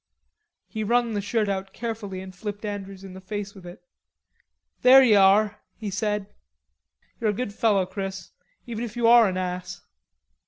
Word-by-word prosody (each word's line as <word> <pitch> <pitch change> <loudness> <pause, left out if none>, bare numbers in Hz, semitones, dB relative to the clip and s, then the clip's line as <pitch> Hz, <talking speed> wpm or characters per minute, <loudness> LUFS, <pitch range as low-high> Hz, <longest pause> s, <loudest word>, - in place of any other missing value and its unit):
He 220 -1 -5
wrung 235 +1 +1
the 205 - -1
shirt 210 +1 0
out 195 -1 -3
carefully 220 -5 -5
and 190 0 -10
flipped 205 +2 -6
Andrews 195 -2 -6
in 190 -1 -10
the 190 - -10
face 205 +1 -5
with 185 -3 -13
it. 175 +5 -12 1.0
"There 265 +1 +8
ye 235 -4 +5
are," 205 +1 +4 0.2
he 210 -3 -5
said. 210 0 -1 0.9
"You're 225 -3 +1
a - - +1
good 205 -1 -4
fellow, 205 -4 +2
Chris, 195 0 -6 0.3
even 235 -1 -5
if 230 -1 -6
you 240 - +1
are 235 -1 +7
an 185 - -3
ass." 180 0 -4
205 Hz, 170 wpm, -25 LUFS, 195-225 Hz, 1.0 s, There